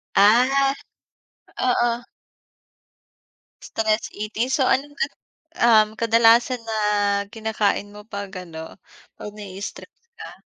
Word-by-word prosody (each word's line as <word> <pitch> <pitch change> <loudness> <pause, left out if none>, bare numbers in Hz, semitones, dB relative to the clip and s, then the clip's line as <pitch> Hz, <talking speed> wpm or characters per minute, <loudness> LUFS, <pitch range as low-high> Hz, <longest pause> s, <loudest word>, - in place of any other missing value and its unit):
Ah, 255 +7 +4 0.9
oo. 240 -1 +2 1.7
Stress 220 0 -1
eating. 220 +4 -3
So, 265 -2 +2
ano-ano, 290 - -1 0.4
um, 220 -2 +5
kadalasan 230 +2 +4
na 225 -1 -4 0.6
kinakain 220 -2 -1
mo 210 0 -13
'pag 200 -2 -6 0.2
ano, 160 +1 -10 0.4
'pag 210 - -8
na-i-stress 200 -1 -9 0.2
ka? - - -9
220 Hz, 90 wpm, -22 LUFS, 210-240 Hz, 1.7 s, um